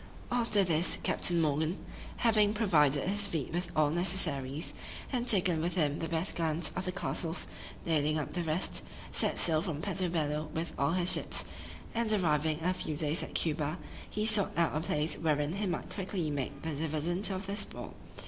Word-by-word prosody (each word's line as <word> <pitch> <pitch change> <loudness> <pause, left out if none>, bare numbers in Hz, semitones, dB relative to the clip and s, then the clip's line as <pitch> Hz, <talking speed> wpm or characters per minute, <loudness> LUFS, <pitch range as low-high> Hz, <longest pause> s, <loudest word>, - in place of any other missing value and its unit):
After 230 -4 +4
this, 170 -1 +1
Captain 175 -1 +2
Morgan 155 +3 +1 0.4
(having 215 -2 +3
provided 150 -9 +3
his 205 +1 +2
fleet 160 -6 -3
with 175 +1 -2
all 150 -1 +3
necessaries, 160 -5 0 0.4
and 245 -1 0
taken 180 -7 +4
with 175 +3 -1
him 150 -4 +1
the 165 - -2
best 165 +3 0
guns 165 0 0
of 180 - -2
the 185 - -1
castles, 175 -3 -3 0.4
nailing 155 -2 +2
up 150 - -3
the 180 - -1
rest) 160 +3 0 0.3
set - - 0
sail 160 -2 +2
from 160 -3 -3
Puerto 190 -2 0
Bello 155 -2 -1
with 165 +1 -2
all 140 +4 +1
his 180 0 +4
ships, - - -1 0.5
and 230 -1 0
arriving 160 -6 +2
in 165 - -7
a 180 - +3
few 160 -4 -4
days 150 +1 +1
at - - -7
Cuba, 155 0 0 0.3
he 215 0 -1
sought 210 -6 +3
out 170 -3 +2
a - - +1
place 155 -1 0
wherein 150 -1 +1
he 200 +1 -2
might 175 - -3
quickly 185 -5 -2
make 140 -3 -4
the 160 - -2
dividend 160 +6 0
of 190 0 -3
their 200 +1 -3
spoil. - - -3
165 Hz, 185 wpm, -31 LUFS, 155-190 Hz, 0.5 s, After